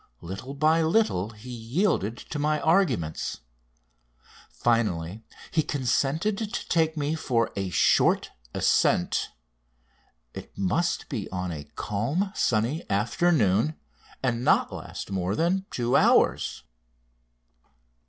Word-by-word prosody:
Little 95 Hz, -, -7 dB
by 155 Hz, +3 st, +3 dB
little 160 Hz, -, +2 dB
he 110 Hz, +3 st, -11 dB
yielded 120 Hz, -, 0 dB
to 150 Hz, -, -6 dB
my 150 Hz, +1 st, +1 dB
arguments. 160 Hz, -, +1 dB, 1.1 s
Finally 105 Hz, -5 st, 0 dB, 0.3 s
he 160 Hz, -, +3 dB
consented 145 Hz, -, 0 dB
to 215 Hz, -2 st, -4 dB
take 160 Hz, -1 st, +2 dB
me 145 Hz, +1 st, 0 dB
"for 120 Hz, -7 st, 0 dB
a 95 Hz, -1 st, -2 dB
short 90 Hz, -, +3 dB, 0.2 s
ascent." -, -, +2 dB, 1.0 s
It -, -, -10 dB
must 110 Hz, -, 0 dB
be 115 Hz, -9 st, -4 dB
on 90 Hz, -1 st, -3 dB
a 75 Hz, -3 st, -6 dB
calm, 140 Hz, -, -1 dB
sunny 120 Hz, -, 0 dB
afternoon, 120 Hz, -, +2 dB, 0.5 s
and 120 Hz, -2 st, 0 dB
not -, -, +3 dB
last -, -, -7 dB
more 95 Hz, +1 st, -1 dB
than 185 Hz, -, 0 dB
two 120 Hz, 0 st, 0 dB
hours. -, -, +3 dB
125 Hz, 110 wpm, -26 LUFS, 100-160 Hz, 1.1 s, by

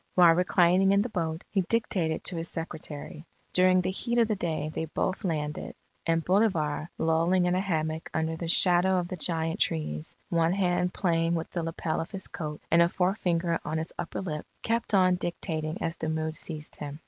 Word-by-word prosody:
While 175 Hz, -2 st, +7 dB
reclining 180 Hz, +2 st, +4 dB
in 200 Hz, +1 st, +4 dB
the 245 Hz, -, -4 dB
boat, 165 Hz, -4 st, -2 dB
he 195 Hz, -, +2 dB
dictated 180 Hz, -5 st, 0 dB
to 180 Hz, -, +1 dB
his 165 Hz, 0 st, -2 dB
secretary. 155 Hz, -2 st, -6 dB, 0.3 s
During 185 Hz, 0 st, +5 dB
the 185 Hz, -, -1 dB
heat 235 Hz, +5 st, -2 dB
of 230 Hz, -2 st, +4 dB
the 215 Hz, -, 0 dB
day 160 Hz, -4 st, -2 dB
they 160 Hz, -, -2 dB
both 185 Hz, +6 st, -2 dB
landed, 150 Hz, -4 st, -3 dB, 0.3 s
and 165 Hz, -1 st, +1 dB
Bolivar, 175 Hz, -6 st, +1 dB
lolling 165 Hz, +3 st, +2 dB
in 180 Hz, -, +2 dB
a 185 Hz, -, +2 dB
hammock 160 Hz, -4 st, -2 dB
under 160 Hz, 0 st, -1 dB
the 165 Hz, +1 st, -5 dB
shadow 180 Hz, +2 st, +5 dB
of 175 Hz, -1 st, -1 dB
the -, -, -3 dB
giant 165 Hz, -1 st, -1 dB
trees, 75 Hz, -1 st, -1 dB
one 165 Hz, 0 st, +2 dB
hand 180 Hz, -2 st, +1 dB
playing 170 Hz, -3 st, +1 dB
with 165 Hz, -1 st, -4 dB
the 175 Hz, -, -2 dB
lapel 165 Hz, 0 st, -2 dB
of 165 Hz, -, -6 dB
his 190 Hz, -2 st, -5 dB
coat 150 Hz, -2 st, -6 dB
and 170 Hz, +1 st, +6 dB
a 170 Hz, -, +5 dB
forefinger 180 Hz, -3 st, 0 dB
on 155 Hz, +1 st, -2 dB
his 160 Hz, +1 st, -4 dB
upper 170 Hz, -, -4 dB
lip, 155 Hz, -5 st, -5 dB, 0.2 s
kept 230 Hz, -2 st, 0 dB
on 185 Hz, -1 st, +4 dB
dictating 165 Hz, -1 st, -3 dB
as 165 Hz, 0 st, -2 dB
the 160 Hz, -, -3 dB
mood 160 Hz, 0 st, -2 dB
seized 155 Hz, -3 st, -6 dB
him. 145 Hz, 0 st, -6 dB
170 Hz, 195 wpm, -28 LUFS, 160-185 Hz, 0.3 s, While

